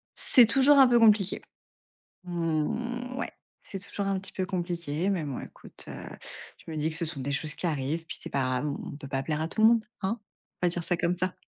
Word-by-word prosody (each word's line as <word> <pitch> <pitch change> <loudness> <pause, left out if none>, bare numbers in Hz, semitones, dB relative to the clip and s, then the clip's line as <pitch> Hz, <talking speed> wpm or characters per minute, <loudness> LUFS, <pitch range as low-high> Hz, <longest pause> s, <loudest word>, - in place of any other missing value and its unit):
C'est 245 -4 +10
toujours 270 +5 +5
un 265 - +8
peu 240 -1 +4
compliqué. 210 -4 +3 0.8
Mmh, 180 +10 -3
ouais. - - -4 0.3
C'est 195 - -8
toujours 200 +1 -5
un 195 -1 0
petit 195 - -5
peu 185 -1 -3
compliqué. 175 -1 -2
Mais 175 -6 -1
bon, 140 -3 -5
écoute, - - -9
heu, - - -7 0.7
je - - -8
me 155 - -6
dis 155 +2 -1
que 155 - -4
ce 170 - -2
sont 155 -4 -2
des 140 +2 -3
choses 150 +2 -1
qui 180 - -4
arrivent, 155 +2 -2
puis - - -6
c'est - - -8
pas 140 - 0
grave, 130 +3 -1
on 140 - -3
on - - -8
peut 140 -2 -10
pas 135 -1 -2
plaire 150 +2 -2
à 160 - -2
tout 215 - -3
le 220 - +8
monde, 230 -2 +2 0.2
hein? 215 +5 -1 0.4
On - - +3
va - - +4
dire 170 -1 -4
ça 175 - 0
comme 175 +1 -1
ça. 185 +1 -2
175 Hz, 245 wpm, -27 LUFS, 155-205 Hz, 0.8 s, C'est